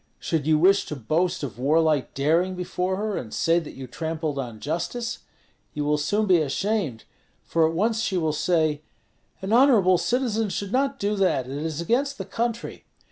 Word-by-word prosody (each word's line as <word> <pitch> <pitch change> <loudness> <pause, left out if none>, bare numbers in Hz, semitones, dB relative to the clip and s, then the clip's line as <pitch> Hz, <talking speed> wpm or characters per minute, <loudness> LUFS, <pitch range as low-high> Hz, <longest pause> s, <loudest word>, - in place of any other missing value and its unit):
Should 155 -3 -2
you 155 -1 +4
wish 195 +5 +4
to 150 - -4
boast 165 +8 -1
of 120 -5 -6
warlike 155 +1 +2
daring 165 +7 +1
before 180 +1 -2
her, 210 0 -2
and 110 - -6
say 165 +1 +2
that 165 - -9
you 135 - -7
trampled 155 +1 -3
on 120 -5 -5
justice, 175 - -3 0.6
you 150 0 -2
will 150 0 +1
soon 205 +9 +1
be 180 -4 +4
ashamed; 155 - -1 0.4
for 165 -1 +2
at 165 - -5
once 220 +5 +1
she 190 -4 -1
will 160 -3 0
say, 155 -2 +1 0.6
'An 195 +3 -1
honorable 225 -9 +5
citizen 230 -4 0
should 200 +1 -4
not 275 +2 +1
do 205 -3 -1
that; 185 -9 +1
it 130 +2 -6
is 155 +2 -3
against 270 - 0
the 190 - -5
country.' 230 +3 -3
170 Hz, 185 wpm, -25 LUFS, 150-210 Hz, 0.6 s, honorable